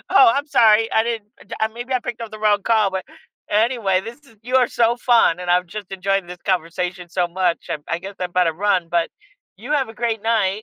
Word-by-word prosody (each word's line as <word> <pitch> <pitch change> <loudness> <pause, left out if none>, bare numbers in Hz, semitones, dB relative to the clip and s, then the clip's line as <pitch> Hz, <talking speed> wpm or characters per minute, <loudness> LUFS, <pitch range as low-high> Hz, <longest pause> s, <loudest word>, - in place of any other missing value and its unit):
"Oh, 390 -1 +7
I'm 285 +2 -1
sorry. 225 -4 +4
I 220 - +4
didn't 225 -3 -4 0.3
uh, 220 - +2
maybe 240 +2 -6
I 255 - +1
picked 240 -1 -6
up 225 - -7
the 215 - -9
wrong 205 -2 +2
call, 215 -4 +2
but" 190 -1 -4 0.5
Anyway, 215 -3 +2
this 235 +5 -9
is 230 - -21
you 255 +3 0
are 250 -2 +4
so, 235 0 +2
fun 230 -8 +3
and 180 - -3
I've 180 0 +3
just 205 +1 -8
enjoyed 195 -1 -1
this 180 0 -8
conversation 180 0 -2
so 180 -1 0
much. 180 -1 -1
I'm 150 - -3
I 170 0 -1
guess 195 +3 -9
I 180 - 0
better 175 -2 +1
run, 185 -2 0
but 170 -1 +1 0.5
you 245 +9 -6
have 275 -5 +1
a - - -13
great 225 -2 -2
night. 215 -2 +1
210 Hz, 230 wpm, -21 LUFS, 180-230 Hz, 0.5 s, Oh